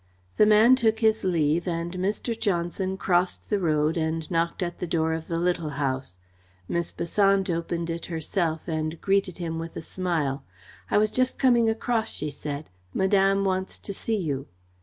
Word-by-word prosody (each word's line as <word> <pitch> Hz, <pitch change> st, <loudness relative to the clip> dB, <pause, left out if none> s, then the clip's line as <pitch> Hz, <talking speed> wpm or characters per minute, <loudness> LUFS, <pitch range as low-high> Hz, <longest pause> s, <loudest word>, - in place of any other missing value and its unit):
The 210 Hz, -, +6 dB
man 215 Hz, +4 st, +7 dB
took 225 Hz, -3 st, +2 dB
his 220 Hz, -1 st, +3 dB
leave 170 Hz, -2 st, +1 dB
and 170 Hz, 0 st, -2 dB
Mr. 200 Hz, +6 st, -1 dB
Johnson 190 Hz, -2 st, -1 dB
crossed 180 Hz, +1 st, 0 dB
the 205 Hz, -, +2 dB
road 155 Hz, -2 st, +1 dB
and 160 Hz, 0 st, -2 dB
knocked 170 Hz, +2 st, 0 dB
at 175 Hz, -1 st, -4 dB
the 180 Hz, -, -3 dB
door 160 Hz, -1 st, +1 dB
of 160 Hz, 0 st, -4 dB
the 165 Hz, -, -2 dB
Little 170 Hz, -2 st, 0 dB
House. 130 Hz, -8 st, -2 dB, 0.5 s
Miss 170 Hz, 0 st, -2 dB
Besant 195 Hz, +2 st, +2 dB
opened 170 Hz, 0 st, -2 dB
it 165 Hz, 0 st, -5 dB
herself 165 Hz, 0 st, -2 dB
and 155 Hz, 0 st, -2 dB
greeted 195 Hz, -2 st, +1 dB
him 165 Hz, -2 st, -3 dB
with 165 Hz, 0 st, -6 dB
a -, -, -4 dB
smile. 160 Hz, -7 st, -2 dB, 0.5 s
"I -, -, +3 dB
was 215 Hz, 0 st, +3 dB
just 255 Hz, +2 st, +1 dB
coming 240 Hz, -4 st, +4 dB
across," 225 Hz, 0 st, 0 dB
she 150 Hz, 0 st, -3 dB
said. 145 Hz, -1 st, -6 dB, 0.2 s
"Madame 195 Hz, 0 st, +3 dB
wants 190 Hz, 0 st, -1 dB
to 200 Hz, -, -5 dB
see 220 Hz, +3 st, -1 dB
you." 145 Hz, -8 st, -3 dB
175 Hz, 175 wpm, -26 LUFS, 160-195 Hz, 0.5 s, man